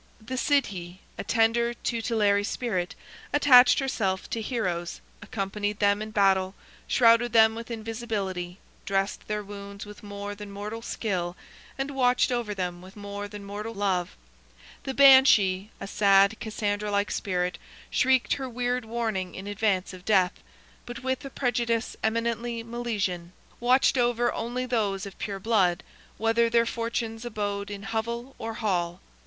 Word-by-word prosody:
The 235 +4 -6
Sidhe, 195 - 0 0.2
a - - -2
tender, 235 +1 +2
tutelary 220 -4 +1
spirit, 205 -5 -2 0.4
attached 260 -4 +7
herself 210 -9 -1
to 230 - -2
heroes, 180 -8 -2 0.2
accompanied 205 -1 -3
them 205 0 +2
in 215 - -4
battle, 195 -2 +2 0.3
shrouded 230 -1 +4
them 220 -1 +6
with 230 +1 -7
invisibility, 215 -6 -4 0.3
dressed 195 +1 -1
their 210 0 -2
wounds 200 0 -8
with 210 0 -11
more 205 0 -6
than 205 0 -9
mortal 210 +3 -6
skill, 180 -7 -3 0.4
and 275 +1 -2
watched 250 -2 +2
over 235 -4 -1
them 180 -2 -3
with 185 +2 -13
more 205 0 -6
than 205 0 -9
mortal 210 +3 -6
love; 185 - -1 0.7
the 265 - -3
Banshee, 225 -8 +6
a - - -5
sad, 200 +1 +4
Cassandra 210 -2 -2
like 200 0 0
spirit, 180 -2 -1 0.3
shrieked 260 -1 +3
her 265 -2 -4
weird 245 0 -1
warning 220 -6 -2
in 190 - -7
advance 205 -2 0
of 185 -1 -11
death, 190 -3 +3 0.5
but 240 0 -7
with 260 +1 -1
a - - -5
prejudice 235 -3 -1
eminently 230 +1 -1
Milesian, 210 -7 -3 0.3
watched 255 +2 +3
only 240 0 0
over - - -5
those 205 -5 0
of 195 - -10
pure 200 -2 -4
blood, 190 -5 +2 0.3
whether 230 +1 +2
their 235 0 +3
fortunes 230 -1 -3
abode 205 -3 -3
in 200 -1 -7
hovel 235 +5 -3
or 225 0 -4
hall. 180 -6 -1
215 Hz, 145 wpm, -27 LUFS, 195-235 Hz, 0.7 s, attached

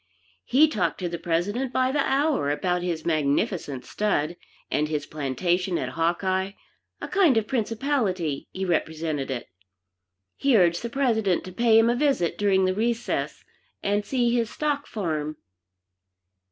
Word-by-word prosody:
He 295 +5 +5
talked 310 - -1
to 180 - -1
the 170 0 -5
President 205 +11 -1
by 260 0 +1
the 290 - 0
hour 275 - +1
about 180 +4 0
his 170 -3 -3
magnificent 155 - 0
stud, 175 -6 -1 0.4
and 150 +1 +1
his 150 -2 -2
plantation 170 +6 -1
at 130 - -2
Hawkeye, 185 +5 0 0.5
a - - -5
kind 340 - +4
of 220 - +2
principality 220 - -1
he 190 0 -3
represented 160 -4 -1
it. 130 -3 -4 0.9
He 275 -4 +3
urged 170 -2 +3
the 235 - -4
President 225 -8 +1
to 185 - -8
pay 225 +3 +4
him 225 +1 +5
a 240 - +2
visit 270 - +1
during 195 -2 +2
the 185 - +1
recess, 230 +3 -2 0.4
and 205 +1 +1
see 240 0 +1
his 230 -2 +1
stock 295 -1 -2
farm. 155 -7 -3
190 Hz, 150 wpm, -25 LUFS, 165-235 Hz, 0.9 s, He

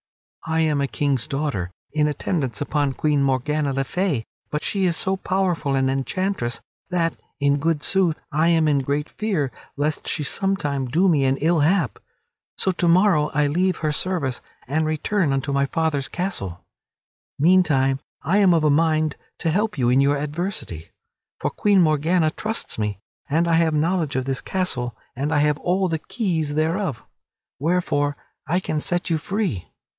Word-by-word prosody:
I 160 0 +1
am 150 -3 +1
a 140 - +1
King's 140 -4 -1
daughter 135 - -2 0.2
in 150 -1 +2
attendance 140 - -2
upon 145 -3 0
Queen 150 0 +1
Morgana 140 +2 +1
le 135 0 0
Fay, 155 - -1 0.2
but 150 - -3
she 195 -2 +1
is 170 -3 +1
so 190 0 +1
powerful 185 -7 0
an 135 0 +2
enchantress 135 0 -1 0.3
that, 170 -2 +1 0.3
in 140 0 +2
good 160 0 0
sooth, 185 -5 +2
I 155 +2 +2
am 165 -2 +3
in 145 -2 +3
great 145 +3 -1
fear 185 -12 -2 0.3
lest 150 +1 -1
she 155 - 0
some 195 +6 +1
time 140 -5 -2
do 170 +10 +2
me 150 -6 +3
an 135 +1 +2
ill 165 +3 +2
hap. 150 - +2 0.6
So 190 - +2
to 175 -1 0
morrow 170 -3 +4
I 150 0 +3
leave 180 +5 +1
her 155 -1 -1
service 150 -6 -1 0.3
and 155 +4 0
return 155 +2 0
unto 135 +1 -1
my 140 0 +1
father's 150 -3 0
castle. 100 - -4 0.7
Meantime, 145 -5 +3 0.2
I 185 +8 +2
am 185 -4 +5
of 160 - +2
a 150 - +4
mind 155 0 +2 0.2
to 165 - -1
help 210 +2 0
you 120 -2 +2
in 130 +2 +4
your 140 +1 +3
adversity. 150 - -4 0.5
For - - -1
Queen 205 -2 +3
Morgana 155 0 +3
trusts 220 - -2
me, 105 -2 -1 0.3
and 165 +4 +2
I 170 - +2
have 165 -1 +3
knowledge 160 -2 0
of 130 -1 0
this 135 -1 -1
castle 125 -11 -1 0.2
and 140 +4 -2
I 155 - +2
have 150 0 +2
all 185 +2 +1
the 165 -2 -1
keys 160 -7 -2
thereof, 160 - -1 0.6
wherefore 145 -3 0 0.3
I 175 +3 +2
can 155 -4 -2
set 175 +3 -2
you 160 - +2
free. 185 - -2
155 Hz, 175 wpm, -23 LUFS, 140-175 Hz, 0.7 s, am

